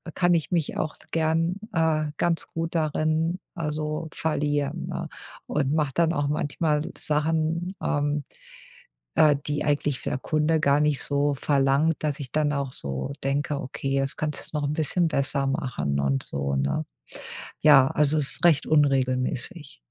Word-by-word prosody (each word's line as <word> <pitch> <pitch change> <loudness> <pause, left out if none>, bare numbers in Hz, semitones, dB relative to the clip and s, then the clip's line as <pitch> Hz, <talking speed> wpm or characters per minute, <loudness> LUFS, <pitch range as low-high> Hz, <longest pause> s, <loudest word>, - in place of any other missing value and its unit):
kann 175 -1 +3
ich 165 -3 0
mich 170 -4 0
auch 150 - -2 0.2
gern, 165 +3 +1
äh, 155 -2 +1
ganz 170 -1 0
gut 165 0 -4
darin 155 +2 0 0.2
also 155 0 -3
verlieren, 145 -2 -1
ne? - - -4 0.4
Und 145 -1 0
mache 150 -3 +1
dann 165 -1 +2
auch 145 -3 0
manchmal 150 +1 0 0.2
Sachen, 160 +4 0
ähm, 145 0 0 0.9
äh, 150 -2 +5
die 145 0 -1
eigentlich 145 -2 0
der - - -2
Kunde 155 +2 +1
gar 145 0 +3
nicht 150 -2 +1
so 145 0 +1
verlangt, 140 +3 +2
dass 150 -1 -1
ich 130 -3 -7
dann 150 -1 +1
auch 140 -2 -2
so 70 - -4
denke, 140 +1 -1
okay, 135 +1 -2
das 135 0 -2
kannst 150 0 -4
du 150 - +1
noch 145 - -1
'n - - -1
bisschen 165 +3 +1
besser 140 -1 0
machen 120 - -1
und 70 -1 +1
so, 70 0 -2
ne? 70 +3 0 0.8
Ja, 135 -3 +7
also 150 +1 +2
es 140 - +2
ist - - -6
recht 160 -5 +4
unregelmäßig. 135 - 0
150 Hz, 155 wpm, -25 LUFS, 140-160 Hz, 0.9 s, Ja